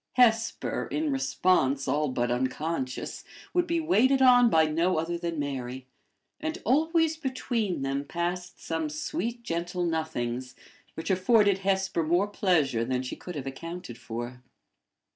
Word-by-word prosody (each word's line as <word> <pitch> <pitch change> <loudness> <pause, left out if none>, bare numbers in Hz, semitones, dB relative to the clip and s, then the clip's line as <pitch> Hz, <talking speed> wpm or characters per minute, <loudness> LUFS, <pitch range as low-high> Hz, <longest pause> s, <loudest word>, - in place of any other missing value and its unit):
Hesper, 230 -2 +2
in 310 -1 -1
response 145 - +2
all 150 +3 +1
but 120 -2 -1
unconscious, 130 +2 -2 0.3
would 355 -1 +2
be 335 0 +1
waited 275 -5 +3
on 245 -2 +7
by 160 -6 +5
no 165 +4 +1
other 165 +2 -1
than 170 -1 -3
Mary; 130 -3 -4 0.5
and 315 +2 -3
always 320 +3 +2
between 240 - -2
them 135 +1 -1
passed 175 +3 -3
some 160 -2 -2
sweet, 210 +10 -3
gentle 175 -1 -2
nothings, 130 -7 -2 0.4
which 165 +3 -3
afforded 200 +1 +4
Hesper 190 -2 0
more 175 +6 +2
pleasure 160 - +1
than 125 +1 -1
she 125 - -5
could 180 - -8
have 140 -3 -4
accounted 165 0 -6
for. 120 +2 -6
170 Hz, 140 wpm, -28 LUFS, 135-225 Hz, 0.5 s, on